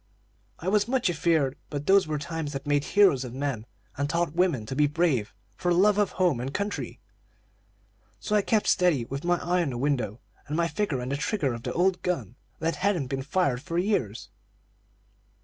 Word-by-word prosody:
"I 170 - -7
was 205 +2 +3
much 250 -7 +1
afeard; 155 -4 +1
but 145 -1 -4
those 195 -1 +5
were 155 -1 -1
times 150 0 -4
that 135 0 -5
made 145 0 +1
heroes 195 -11 +4
of 125 -1 -7
men, 135 -5 -3 0.3
and 145 +1 -1
taught 170 -1 0
women 170 -10 +1
to 130 - -5
be 150 +1 +4
brave 145 -8 +1 0.2
for 175 +9 -1
love 200 +4 +4
of 205 - +1
home 175 -9 +2
and 130 +3 -3
country. 200 +5 -3 1.2
So 210 - -1
I 210 - +5
kept 215 +1 +1
steady, 170 -10 +3
with 135 +4 -5
my 175 0 +3
eye 175 +2 0
on 165 - 0
the 125 - -4
window, 125 -5 -1 0.3
and 150 +2 -2
my 170 0 +2
finger 155 -6 -2
on 125 - -4
the 140 - -1
trigger 145 - -1
of 115 - -6
the 125 +1 -4
old 180 +1 +2
gun, 130 - -2 0.2
that 165 +1 -1
hadn't 180 -10 0
been 135 -1 -2
fired 140 -3 0
for 165 +4 -4
years. 175 - -1
155 Hz, 200 wpm, -27 LUFS, 135-180 Hz, 1.2 s, those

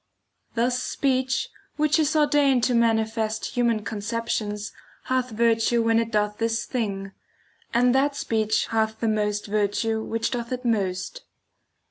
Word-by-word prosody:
Thus 245 +2 +1
speech, 260 -1 0 0.3
which 305 +1 +2
is 310 0 +1
ordained 290 -4 +3
to 250 - +2
manifest 220 -1 +1
human 235 -3 +1
conceptions 215 -1 -3 0.3
hath 255 -1 0
virtue 230 +1 +2
when 225 0 +3
it 230 0 -1
doth 210 -1 0
this 230 +1 0
thing; 195 -6 -3 0.6
and 245 +1 +3
that 275 +2 +2
speech 220 -4 0
hath 220 0 0
the 230 - 0
most 210 -1 0
virtue 215 +2 0
which 225 +1 -2
doth 235 0 -4
it 250 0 -4
most. 205 - -1
230 Hz, 135 wpm, -25 LUFS, 215-250 Hz, 0.6 s, ordained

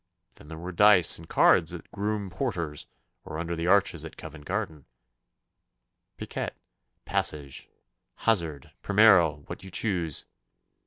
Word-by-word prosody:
Then - - -16
there 80 +1 -8
were 90 +3 -6
dice 95 -3 +5
and 80 - -13
cards - - +4
at - - -7
the - - -32
Groom 105 -1 -3
Porter's 85 - -4 0.4
or 75 - -7
under 85 +1 -3
the 85 +1 -3
arches 95 -5 +3
at 80 - -10
Covent 75 -2 -10
Garden, 90 - -4 1.3
piquet, - - -5 0.5
passage, 70 -3 -3 0.5
hazard, 85 -11 -1
primero 95 -8 +4
what - - -8
you 95 - -9
choose. 90 - -2
85 Hz, 135 wpm, -27 LUFS, 80-100 Hz, 1.3 s, dice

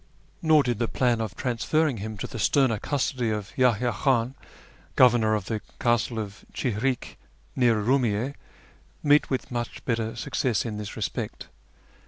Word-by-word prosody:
Nor 155 -3 +5
did 120 -4 -1
the 120 - +1
plan 120 -2 +1
of 110 -4 -4
transferrin 135 +3 0
q; 100 - -6
him 110 -1 -5
to - - -4
the 115 - -7
sterner 125 -1 +3
custody 130 -3 -1
of 105 0 -3
Yahya 125 -3 +3
Khan, 130 -3 +1 0.6
governor 115 -4 +5
of 105 -3 -3
the 110 0 -3 0.2
castle 120 0 +1
of 105 -2 -6
Chihrik, 125 +2 -2 0.4
near 120 -3 +4
Urumiyye, 120 +1 +1 0.7
meet 145 0 +4
with 130 -1 -2
much 120 -1 -4
better 115 -2 -1
success 115 -1 -1
in 110 -3 -4
this 105 -1 -6
respect. - - -4
120 Hz, 155 wpm, -26 LUFS, 110-130 Hz, 0.7 s, Nor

